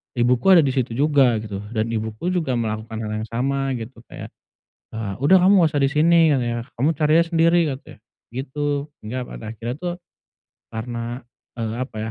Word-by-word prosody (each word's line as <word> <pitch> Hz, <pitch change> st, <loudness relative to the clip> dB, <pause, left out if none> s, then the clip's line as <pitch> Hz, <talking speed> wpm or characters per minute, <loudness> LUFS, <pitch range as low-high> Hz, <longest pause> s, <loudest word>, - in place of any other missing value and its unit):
ibuku 125 Hz, +10 st, +4 dB
ada 165 Hz, -, +7 dB
di 135 Hz, -, +1 dB
situ 130 Hz, -3 st, 0 dB
juga 140 Hz, -4 st, +4 dB
gitu, 100 Hz, -2 st, -5 dB, 0.2 s
dan 110 Hz, +1 st, 0 dB
ibuku 110 Hz, +9 st, -3 dB
juga 160 Hz, -8 st, 0 dB
melakukan 110 Hz, -1 st, -3 dB
hal 105 Hz, -, -4 dB
yang -, -, -7 dB
sama 135 Hz, +4 st, -1 dB
gitu. 115 Hz, +1 st, -8 dB
Kayak, -, -, -9 dB, 0.6 s
eee, 105 Hz, -3 st, -3 dB
"Udah 145 Hz, +8 st, +6 dB
kamu 195 Hz, +2 st, +6 dB
enggak 165 Hz, -, +4 dB
usah 145 Hz, -, +2 dB
di 135 Hz, -, +3 dB
sini," 165 Hz, +1 st, +4 dB
katanya, 120 Hz, -3 st, 0 dB, 0.2 s
"kamu 140 Hz, -, +3 dB
cari 150 Hz, +1 st, +1 dB
aja 170 Hz, -, +3 dB
sendiri," 170 Hz, +1 st, +4 dB
katanya, 135 Hz, -1 st, -7 dB, 0.4 s
gitu. 145 Hz, +2 st, -2 dB
Sehingga 110 Hz, +4 st, -4 dB
pada 110 Hz, -1 st, -8 dB
akhirnya, 115 Hz, +2 st, -5 dB
tuh, 175 Hz, -1 st, -3 dB, 0.8 s
karena, 120 Hz, +2 st, -5 dB, 0.4 s
eee, 110 Hz, -1 st, -2 dB
apa 130 Hz, -3 st, -5 dB
130 Hz, 180 wpm, -22 LUFS, 115-150 Hz, 0.8 s, ada